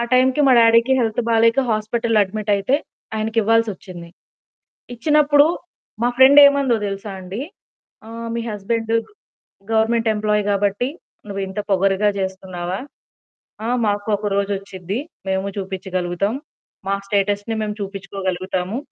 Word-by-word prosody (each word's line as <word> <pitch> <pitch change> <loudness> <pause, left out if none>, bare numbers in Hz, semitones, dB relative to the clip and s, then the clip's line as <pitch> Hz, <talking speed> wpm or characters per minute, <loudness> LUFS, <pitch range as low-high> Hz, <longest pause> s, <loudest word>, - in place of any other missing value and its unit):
ఆ - - +1
టైంకి 255 +3 +4
మా 265 - +6
డాడీకి 230 +2 +5
హెల్త్ 225 0 0
బాలేక 230 +1 +3
హాస్పిటల్‌లో 220 +1 0
అడ్మిటయితే 210 +4 0 0.4
ఆయనకి 220 +1 -2
ఇవ్వాల్సొచ్చింది. 200 -6 -1 0.9
ఇచ్చినప్పుడు 295 +3 +4 0.6
మా 240 - +3
ఫ్రెండేమందో 280 -1 +7
దెలుసా 195 0 -5
అండి? 185 +5 -6 0.7
"ఆహ్, 230 +1 -7
మీ 235 - -1
హస్బెండు 225 +2 -1 0.8
గవర్నమెంట్ 225 +1 +2
ఎంప్లాయీ 210 -1 0
గాబట్టి 205 +4 0 0.4
నువ్వింత 195 0 -5
పొగరుగా 195 +2 +2
జేస్తున్నావా? 190 -1 -4 0.9
ఆ - - -2 0.2
మాకు 205 +1 -1
ఒకరోజ 200 -1 -1
వచ్చిద్ది, 195 +1 -6 0.3
మేము 190 0 -1
చూపించగలుగుతాం. 190 +1 -2 0.5
మా 195 - +2
స్టేటస్‌ని 205 +2 0
మేము 210 -1 -3
చూపించుకోగలుగుతాము. 190 0 -3
210 Hz, 110 wpm, -20 LUFS, 195-230 Hz, 0.9 s, ఫ్రెండేమందో